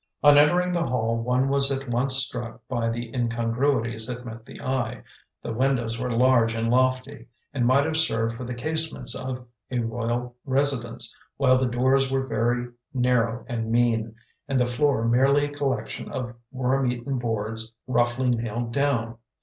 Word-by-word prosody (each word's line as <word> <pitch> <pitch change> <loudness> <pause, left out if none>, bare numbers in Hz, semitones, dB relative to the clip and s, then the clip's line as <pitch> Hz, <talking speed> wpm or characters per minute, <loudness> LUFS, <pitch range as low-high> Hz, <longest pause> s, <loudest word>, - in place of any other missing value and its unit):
On 145 0 +8
entering 175 +5 +4
the 170 -1 0
hall 115 -2 0
one 125 +3 +1
was 140 0 +2
at 135 0 -3
once 125 +2 +1
struck 120 -3 -1
by 120 -2 -1
the 115 0 -5
incongruities 115 -1 +2
that 125 0 -4
met 115 -1 -9
the - - -11
eye; 130 -2 -2 0.4
the - - -4
windows 120 -2 0
were 125 0 -2
large 120 -1 +3
and 115 0 0
lofty, 130 +2 0 0.3
and 125 -3 +1
might 135 +3 +4
have 160 0 -1
served 115 -7 +1
for 125 - -7
the 125 0 -5
casements 160 +5 -1
of 130 -1 -4 0.2
a 125 - -2
royal 120 +1 -2
residence, 125 -4 0 0.2
while 130 -2 +4
the 130 - +1
doors 130 +2 +2
were 135 0 0
very 120 +1 0 0.3
narrow 125 -2 +1
and 115 -2 -3
mean, 115 -2 +1 0.3
and 135 -2 +1
the 125 - +3
floor 125 -1 +1
merely 135 +4 +4
a 145 - -6
collection 140 -2 -3
of 125 -3 -4 0.2
worm 130 0 +1
eaten 125 +2 -3
boards 115 -1 -3
roughly 120 +1 +1
nailed 115 0 -2
down. 120 -5 0
125 Hz, 165 wpm, -25 LUFS, 115-135 Hz, 0.4 s, On